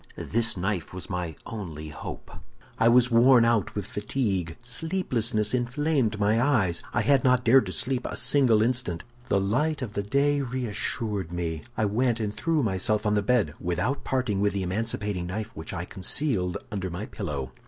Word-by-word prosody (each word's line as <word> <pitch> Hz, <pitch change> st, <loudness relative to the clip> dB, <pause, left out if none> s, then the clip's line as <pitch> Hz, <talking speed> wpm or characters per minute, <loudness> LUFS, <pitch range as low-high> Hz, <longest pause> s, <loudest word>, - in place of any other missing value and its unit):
"This 115 Hz, -1 st, +1 dB
knife 90 Hz, -1 st, -2 dB
was 95 Hz, +2 st, -6 dB
my 90 Hz, -4 st, -3 dB
only 80 Hz, -8 st, -6 dB
hope. 75 Hz, -, -8 dB, 0.5 s
"I 115 Hz, -, +5 dB
was 125 Hz, +1 st, +5 dB
worn 120 Hz, +1 st, +6 dB
out 115 Hz, -4 st, +1 dB
with 105 Hz, -2 st, -3 dB
fatigue. 100 Hz, -6 st, -2 dB
Sleeplessness 120 Hz, -, 0 dB
inflamed 125 Hz, -2 st, 0 dB
my 105 Hz, +3 st, +3 dB
eyes; 110 Hz, -11 st, +2 dB
I -, -, +1 dB
had 140 Hz, -2 st, +3 dB
not 125 Hz, -1 st, +3 dB
dared 120 Hz, -2 st, +5 dB
to -, -, -3 dB
sleep 125 Hz, +9 st, -1 dB
a -, -, -5 dB
single 120 Hz, -7 st, +4 dB
instant. 120 Hz, -9 st, -1 dB, 0.2 s
The 100 Hz, -, +2 dB
light 140 Hz, +9 st, 0 dB
of 110 Hz, -4 st, -6 dB, 0.2 s
day 140 Hz, +2 st, +2 dB
reassured 110 Hz, -6 st, -2 dB
me; 85 Hz, -3 st, -3 dB, 0.2 s
I 110 Hz, -, +2 dB
went 115 Hz, +3 st, +1 dB
and 105 Hz, -2 st, -2 dB
threw 160 Hz, +1 st, 0 dB
myself 105 Hz, +1 st, +1 dB
on 105 Hz, -, +2 dB
the 105 Hz, -, +2 dB
bed, 100 Hz, -8 st, +1 dB
without 90 Hz, +11 st, -1 dB
parting 125 Hz, -7 st, -1 dB
with 100 Hz, 0 st, +2 dB
the 100 Hz, -1 st, -1 dB
emancipating 100 Hz, -1 st, -2 dB
knife, 110 Hz, +4 st, -5 dB
which 80 Hz, 0 st, -7 dB
I 85 Hz, -2 st, -4 dB
concealed 95 Hz, -, -1 dB
under 95 Hz, -3 st, -3 dB
my 90 Hz, +5 st, -5 dB
pillow. 75 Hz, -, -5 dB
110 Hz, 175 wpm, -26 LUFS, 95-125 Hz, 0.5 s, worn